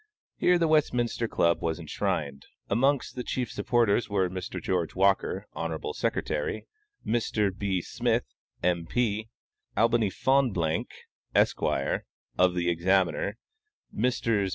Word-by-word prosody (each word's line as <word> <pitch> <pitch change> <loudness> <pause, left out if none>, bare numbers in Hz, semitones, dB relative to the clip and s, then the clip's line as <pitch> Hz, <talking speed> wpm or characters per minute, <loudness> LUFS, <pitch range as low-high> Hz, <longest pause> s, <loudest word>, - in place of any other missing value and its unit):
Here 180 0 +4
the 170 -1 +2
Westminster 125 -7 +1
Club 85 -5 +2
was 80 0 -1
enshrined. 70 -3 -3 0.2
Amongst 135 +3 +2
the 125 - -3
chief 125 -2 -2
supporters 115 0 +1
were 95 -3 +1
Mr. 95 0 -5
George 90 -3 -1
Walker, 95 +1 +2
Hon. 80 -1 -3
Sec.; - - -1 0.9
Mr. 105 -4 0
B. 95 -3 -1
Smith, - - 0 0.4
M. 85 -1 +1
P.; 110 -1 0 0.5
Albany 115 -2 +3
Fonblanque, 100 -11 0 0.3
Esq., - - +3 0.7
of 90 -1 +3
The 90 -1 0
Examiner; 90 +2 +1 0.5
Messrs. 115 -4 +1
100 Hz, 115 wpm, -28 LUFS, 90-120 Hz, 0.9 s, Here